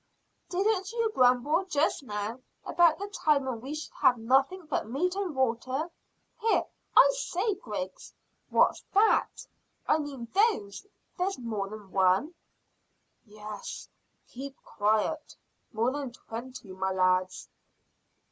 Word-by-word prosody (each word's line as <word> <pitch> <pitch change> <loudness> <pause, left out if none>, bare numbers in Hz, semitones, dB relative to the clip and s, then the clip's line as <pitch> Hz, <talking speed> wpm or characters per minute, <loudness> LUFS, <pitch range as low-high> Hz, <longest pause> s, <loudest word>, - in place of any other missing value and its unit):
"Didn't 385 +1 0
you 460 -1 0
grumble 255 - +3
just 305 -5 +1
now 215 -1 -4 0.3
about 340 -2 +4
the 400 - -5
time 300 -8 +2
when 245 -4 -3
we 275 +5 -5
should 310 - -7
have 250 - +5
nothing 270 +10 +2
but 300 -7 -2
meat 355 +9 0
and 380 -6 -3
water? 260 +5 -1 0.5
Here 450 0 +2 0.3
I - - +9
say 425 -3 -1
Griggs, 205 - -6 0.4
what's - - +3
that 430 +2 +3 0.4
I 315 - +4
mean 275 -5 -6
those? 395 - +1 0.3
There's 385 +2 0
more 215 -5 -3
than 210 -2 -10
one." 190 - +3 0.9
"Yes; 210 -1 -8 0.4
keep 270 +2 -8
quiet. 220 +9 0 0.4
More 230 +2 +1
than 275 -3 -4
twenty, 240 -2 -8
my 190 0 -2
lads." 185 0 +1
265 Hz, 125 wpm, -29 LUFS, 215-350 Hz, 0.9 s, I